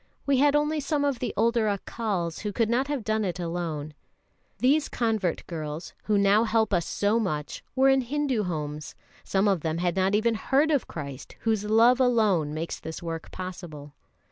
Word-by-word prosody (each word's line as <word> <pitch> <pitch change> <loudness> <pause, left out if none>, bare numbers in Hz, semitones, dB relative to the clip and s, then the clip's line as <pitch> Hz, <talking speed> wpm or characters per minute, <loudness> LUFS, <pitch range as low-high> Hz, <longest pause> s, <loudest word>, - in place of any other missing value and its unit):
We 280 -1 +3
had 290 +1 +4
only 300 +1 +1
some 285 0 0
of 275 -4 0
the 245 -4 -2
older 230 0 +2
Accals, 200 -4 -2
who 210 - -3
could 225 +2 0
not 260 +3 +1
have 285 -5 -2
done 215 +1 0
it 180 -2 -3
alone. 165 -3 -3 0.6
These 285 +4 +2
convert 220 -7 -1
girls, 155 -1 -6
who 210 -1 +2
now 200 +2 +4
help 220 -2 +1
us 170 -3 +1
so 210 +3 +1
much, 155 -9 -3
were 265 +1 +4
in 270 0 +4
Hindu 265 -2 -1
homes; 150 -3 -4 0.3
some 195 +2 +1
of 195 -5 +2
them 160 0 -1
had 175 +1 0
not 190 +1 +2
even 230 +2 +2
heard 275 +7 +2
of 285 -4 +1
Christ, 140 -4 -8
whose 220 -2 0
love 230 +4 +5
alone 215 - +3
makes 160 +2 -4
this 160 +1 -7
work 165 -1 -5
possible. 170 -6 -8
210 Hz, 185 wpm, -26 LUFS, 170-240 Hz, 0.6 s, love